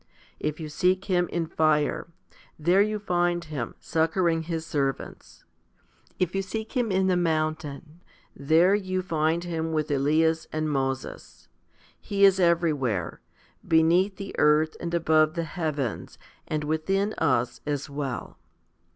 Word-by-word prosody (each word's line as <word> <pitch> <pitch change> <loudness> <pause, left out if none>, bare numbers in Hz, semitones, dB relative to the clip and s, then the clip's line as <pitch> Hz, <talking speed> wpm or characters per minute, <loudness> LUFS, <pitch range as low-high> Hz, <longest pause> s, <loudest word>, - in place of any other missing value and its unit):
If 155 +1 -3
you 160 - -5
seek 185 +5 +1
Him 180 -3 +1
in 170 -1 -2
fire, 155 -2 +1 0.5
there 175 +5 +3
you 215 +1 +1
find 175 -3 0
Him, 150 -7 -5
succouring 165 0 +1
His 165 -1 -2
servants. 140 -4 -4 0.7
If 185 -1 0
you 195 - 0
seek 220 +3 -5
Him 245 -5 0
in 190 0 +2
the 185 -1 +2
mountain, 155 -1 -2 0.3
there 160 +7 +4
you 185 -2 -1
find 165 -1 0
Him 165 -2 -3
with 155 -1 -1
Elias 160 +3 +2
and 155 0 -1
Moses. 135 -1 -4 0.5
He 200 -1 +2
is 195 -1 +5
everywhere 155 - +1 0.5
beneath 170 +5 +3
the 195 +1 -7
earth, 155 +1 +3
and 170 - -4
above 155 -2 +3
the 170 - -1
heavens, 150 -7 -4 0.3
and 155 -1 -2
within 195 +7 0
us 125 -2 +1
as 145 -1 -2
well. 140 -3 -5
160 Hz, 135 wpm, -26 LUFS, 150-180 Hz, 0.7 s, is